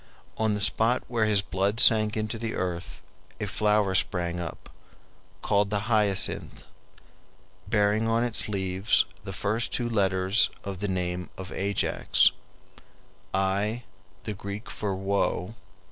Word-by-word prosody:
On 110 -1 0
the 105 - -3
spot 115 +4 +2
where 115 -3 0
his 105 -2 +3
blood 100 +4 -1
sank 110 -2 +5
into 110 +1 -3
the 115 0 -3
earth 90 -1 -4 0.4
a - - -2
flower 105 -2 +1
sprang 90 -2 0
up, 85 -3 -7 0.8
called 100 0 +2
the 100 -1 0
hyacinth, 105 -3 +1 1.0
bearing 105 +1 +2
on 115 +1 +2
its 120 -3 +1
leaves 95 0 +2 0.2
the - - -6
first 110 +4 -2
two 120 - -1
letters 95 -2 +2
of 100 -2 -6
the 105 - -2
name 90 -1 -3
of 95 0 -8
Ajax, 100 +1 +2 1.0
Ai, 100 +5 0 0.4
the 110 -1 -4
Greek 100 +3 -7
for 100 -3 -3
"woe." 95 0 -1
100 Hz, 130 wpm, -27 LUFS, 95-110 Hz, 1.0 s, sank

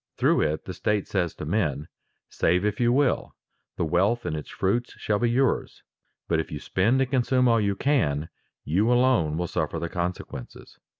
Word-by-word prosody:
Through - - +3
it 80 0 -1
the 95 - -5
state 105 +3 -1
says 90 -4 -1
to - - -6
men: 75 -5 -1 0.4
"Save 90 +4 +1
if 105 -1 -1
you 120 -1 +3
will; 135 +1 +1 0.4
the - - 0
wealth 100 +9 +1
and - - -2
its 75 - -6
fruits 115 +6 -1
shall 105 -1 -1
be 120 - +2
yours. 130 +2 0 0.4
But 80 - +1
if 80 - -4
you 75 - -4
spend 110 - +1
and 130 -1 -1
consume 125 -1 +2
all 115 -2 +4
you 100 -1 0
can, 80 - 0 0.4
you 100 +10 +2
alone 120 -12 +3
will 90 - -1
suffer 85 -1 -2
the 85 +1 -3
consequences." 85 -7 -6
95 Hz, 185 wpm, -25 LUFS, 80-120 Hz, 0.4 s, all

